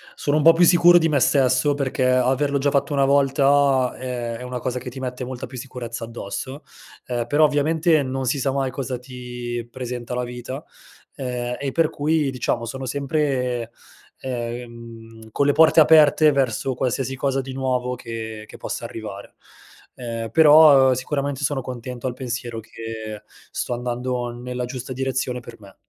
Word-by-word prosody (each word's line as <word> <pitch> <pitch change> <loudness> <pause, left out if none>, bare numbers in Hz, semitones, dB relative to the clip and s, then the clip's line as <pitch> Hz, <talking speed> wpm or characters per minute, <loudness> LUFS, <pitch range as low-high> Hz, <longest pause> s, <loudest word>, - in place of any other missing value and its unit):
Sono 145 +1 0
un 150 - +1
po' 165 +2 +8
più 170 +2 +3
sicuro 175 0 +7
di 165 -1 +2
me 145 - +2
stesso, 130 +1 +3
perché 135 -2 -1
averlo 130 +3 +2
già 140 +1 +1
fatto 140 +1 0
una 140 -1 +3
volta, 140 -1 +3
ehm, 120 -2 -4
è - - -11
una 125 0 -5
cosa 125 +1 -3
che 125 +1 -7
ti 130 +2 -9
mette 125 0 -4
molta 125 -1 -6
più 130 - -10
sicurezza 120 -2 -6
addosso. 115 +5 -6 0.4
Ehm, 120 -2 -2
però 145 +4 +3
ovviamente 155 +2 +2
non 130 0 -3
si 130 +3 0
sa 135 +1 0
mai 135 -1 -1
cosa 130 -1 -4
ti 120 -2 -6
presenta 125 -1 -6
la 125 - -1
vita, 125 +4 -7 0.5
ehm, 125 -2 -3
e 140 -1 -2
per 165 -2 +2
cui 150 -1 0
diciamo, 120 -2 -2
sono 130 +3 -6
sempre, 130 -3 -1 0.5
ehm, 115 -2 -7
con 140 - +1
le 145 - +4
porte 160 +3 +5
aperte 155 0 +6
verso 135 -1 0
qualsiasi 130 +1 -2
cosa 135 0 0
di 130 0 -8
nuovo 125 -1 -1
che 110 -2 -7
che - - -12
possa - - -5
arrivare. 105 -3 -8 0.6
Ehm, 115 -2 -5
però 150 -3 +7
sicuramente 140 +2 -3
sono 140 -2 0
contento 125 0 -6
al 125 - -3
pensiero 120 -2 -5
che 110 -1 -8 0.3
sto 125 - -3
andando 125 0 -3
nella 125 +1 -5
giusta 130 +1 -6
direzione 130 -1 -2
per 115 - -12
me. 100 -2 -15
130 Hz, 170 wpm, -22 LUFS, 120-140 Hz, 0.6 s, po